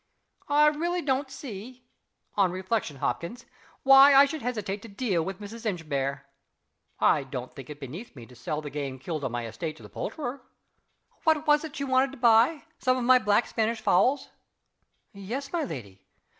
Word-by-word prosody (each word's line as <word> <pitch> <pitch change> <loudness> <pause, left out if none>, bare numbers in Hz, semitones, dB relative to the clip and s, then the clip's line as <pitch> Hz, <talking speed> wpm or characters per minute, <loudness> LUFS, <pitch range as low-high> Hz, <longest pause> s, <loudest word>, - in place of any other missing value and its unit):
"I 295 +1 +5
really 340 +4 +1
don't 270 0 0
see 250 -1 -9 0.5
on 195 -3 +2
reflection, 185 -4 -2
Hopkins 170 - -3 0.4
why 270 +1 +8
I 275 +1 +9
should 310 +1 -5
hesitate 215 -5 -3
to 230 - -10
deal 200 -5 -1
with 190 +3 -5
Mrs. 220 +3 -9
Inchbare. 140 - -2 0.7
(I - - +4
don't 130 -2 -7
think 135 0 -10
it 150 -1 -8
beneath 155 - -8
me 120 -4 -10
to 125 - -16
sell 150 +5 -4
the 145 - -6
game 140 -2 -4
killed 155 +3 -5
on 130 - -2
my 120 -1 -3
estate 155 +7 -5
to - - -15
the - - -11
poulterer.) 280 - -5 0.8
What 315 -2 +2
was 295 0 +4
it 315 -3 -7
she 280 - -3
wanted 260 0 +2
to - - -10
buy? 235 +5 +4 0.2
Some 255 0 +2
of 250 - -2
my 255 +1 +6
black 210 0 +2
Spanish 225 0 -1
fowls?" 260 +5 +2 0.8
"Yes, 240 - -6
my 340 -2 0
lady. 105 - -7
225 Hz, 180 wpm, -27 LUFS, -, 0.8 s, I